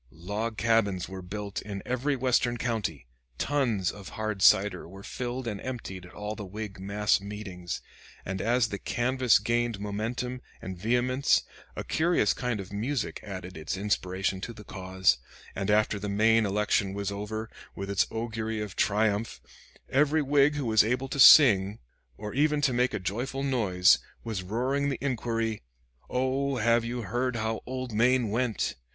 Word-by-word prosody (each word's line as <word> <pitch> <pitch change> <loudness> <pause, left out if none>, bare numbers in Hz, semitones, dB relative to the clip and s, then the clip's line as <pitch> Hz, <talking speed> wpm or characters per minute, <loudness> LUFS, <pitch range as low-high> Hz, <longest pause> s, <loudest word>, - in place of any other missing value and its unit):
Log 105 - -4
cabins 105 -5 +2
were 95 0 -7
built 100 +2 -5
in 100 -1 -6
every 130 +3 0
Western 125 -2 +1
county, 110 - -2 0.3
tuns 120 -10 0
of 100 -2 -10
hard 110 -2 -2
cider 95 0 +4
were 95 +2 -11
filled 125 +3 -4
and 105 -4 -4
emptied 95 -8 -6
at - - -16
all 105 +1 -4
the 105 - -7
Whig 105 0 -7
mass 100 +2 +1
meetings; 100 -4 -6 0.4
and 95 0 -3
as 120 +1 +2
the 100 - -4
canvass 130 0 +2
gained 120 -2 0
momentum 115 +5 -3 0.2
and 95 - -6
vehemence 125 +7 +2 0.3
a - - -4
curious 160 - +2
kind 125 -4 -2
of 95 +1 -8
music 115 +4 -2
added 95 -2 -7
its 80 +4 -4
inspiration 95 -1 -1
to 115 - -5
the 105 -1 -12
cause; 95 -7 +1 0.3
and 95 +1 -3
after 105 0 +2
the 105 +1 -4
Maine 110 +2 +3
election 105 0 +1
was 100 0 -2
over, 105 +2 -4 0.3
with 100 - -5
its 100 -1 +1
augury 110 -1 -3
of 105 -3 -5
triumph, 105 +1 +1 0.5
every 150 +3 +2
Whig 145 +1 +3
who 145 -3 -2
was 110 -2 +5
able 125 +4 -1
to 140 - -4
sing, 105 -8 +8 0.4
or 105 0 -6
even 150 +2 +2
to 135 -3 +2
make 125 -1 +1
a - - -2
joyful 120 +9 -3
noise, 105 -10 +4 0.2
was 110 -5 -3
roaring 130 +9 -1
the 135 - -2
inquiry, 115 -4 -1 0.5
"Oh, 135 +2 0
have 115 0 +3
you 120 0 -3
heard 125 +4 -1
how 110 0 -2
old 130 -2 -4
Maine 120 0 +3
went?" 115 0 0
110 Hz, 165 wpm, -28 LUFS, 100-125 Hz, 0.5 s, sing